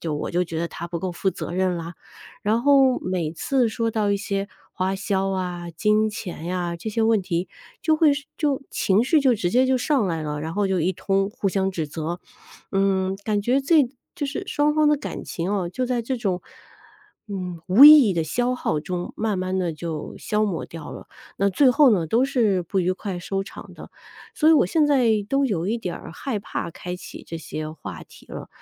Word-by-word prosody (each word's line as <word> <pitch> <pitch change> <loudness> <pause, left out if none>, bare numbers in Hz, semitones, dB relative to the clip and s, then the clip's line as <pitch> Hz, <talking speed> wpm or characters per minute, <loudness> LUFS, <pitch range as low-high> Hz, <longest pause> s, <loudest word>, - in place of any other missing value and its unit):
就 160 -3 -3
我 - - -4
就 175 +1 +1
觉 165 -2 -4
得 170 - -1
他 170 +1 -7
不 170 - -3
够 185 +1 -3
负 190 +3 0
责 170 - -6
任 185 0 0
啦。 170 +1 -6 0.5
然 220 +3 +1
后 270 -2 +5
每 180 -4 -2
次 250 +8 +1
说 230 +1 -1
到 215 -2 0
一 200 - +2
些 200 0 -3 0.2
花 185 +1 -1
销 195 -1 -1
啊、 180 -2 -3
金 210 +6 +2
钱 175 -5 -7
呀， 175 -1 -2
这 170 +6 -6
些 225 +1 0
问 220 -1 +3
题 180 -1 -2 0.3
就 315 - +3
会 310 -2 +5 0.3
就 285 -4 0
情 200 +4 +2
绪 305 +4 +3
就 265 -3 +4
直 200 -5 -1
接 250 +6 +4
就 260 0 +3
上 260 -5 +1
来 165 -3 -2
了， 150 -1 -4
然 160 +2 -5
后 205 -1 +1
就 190 -2 0
一 180 +4 +1
通 195 +2 0
互 205 - -2
相 190 0 0
指 165 -5 -3
责， 160 +4 -5 0.5
嗯， 195 -1 +1
感 210 -2 0
觉 255 +5 +2
这 295 +1 +4 0.3
就 295 -5 -2
是 280 - -4
双 295 +1 +1
方 305 -1 +4
的 300 - +4
感 285 - -6
情 170 +2 -3
啊， 190 -4 -1
就 255 +8 -2
在 245 -1 -1
这 255 +3 -2
种， 195 -6 -2 0.9
嗯， 180 -4 -5
无 200 +10 +8
意 300 -5 +10
义 - - +2
的 165 - +1
消 245 +10 0
耗 155 -10 -1
中 175 +2 -4
慢 215 -3 -1
慢 185 +1 -1
地 175 -3 -1
就 155 -1 -6
消 210 0 0
磨 195 -5 -2
掉 165 -2 -9
了。 - - -10 0.3
那 200 +1 +2
最 260 +7 +4
后 290 -1 +6
呢， 180 -7 +2
都 230 +10 +2
是 225 -9 +1
不 185 +3 -2
愉 180 +1 +1
快 190 -1 -5
收 195 +2 -3
场 - - -11
的。 - - -12 0.4
所 310 - +3
以 - - +8
我 315 - +5
现 305 - +2
在 275 -4 +3 0.2
都 275 +3 +2
有 190 -9 -1
一 220 +4 0
点 180 -6 -4
儿 - - -10
害 260 -6 -3
怕 200 - -5
开 180 +2 -6
启 180 - -10
这 165 - -6
些 155 -1 -5
话 160 - -8
题 - - -18
了， - - -8
195 Hz, 240 characters per minute, -23 LUFS, 175-240 Hz, 0.9 s, 意